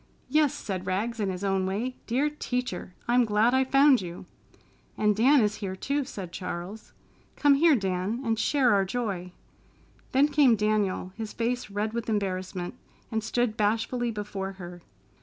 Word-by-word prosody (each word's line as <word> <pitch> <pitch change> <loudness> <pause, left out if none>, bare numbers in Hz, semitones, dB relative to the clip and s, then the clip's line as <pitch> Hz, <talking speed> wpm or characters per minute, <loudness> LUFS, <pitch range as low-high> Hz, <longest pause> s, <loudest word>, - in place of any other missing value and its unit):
"Yes!" 300 -3 +3
said 190 -3 -5
Rags 220 +5 -1
in 200 -2 0
his 185 +1 -4
own 195 -1 +1
way. 230 +7 -2
"Dear 260 +5 +1
Teacher! 250 -9 -4
I'm 245 +1 +4
glad 220 +2 +3
I 260 0 +4
found 275 -1 +5
you!" 175 -1 -8 0.7
"And 210 -1 +2
Dan 260 +6 +5
is 210 0 0
here, 195 -3 -4
too," 280 +7 -1
said 195 -9 -7
Charles. 180 +4 -6 0.4
"Come 290 -1 +4
here, 310 +2 +5
Dan, 190 +1 -1
and 225 -1 0
share 255 0 +3
our 200 -1 +3
joy." 190 -4 -3 0.8
Then 275 +3 +4
came 285 -5 +5
Daniel, 210 -3 0
his 220 -1 -6
face 240 0 -2
red 210 +2 -2
with 235 -1 -3
embarrassment, 185 -3 -2 0.4
and 220 -1 -1
stood 225 0 0
bashfully 225 +3 0
before 205 -3 -4
her. 175 -2 -10
215 Hz, 160 wpm, -27 LUFS, 190-245 Hz, 0.8 s, found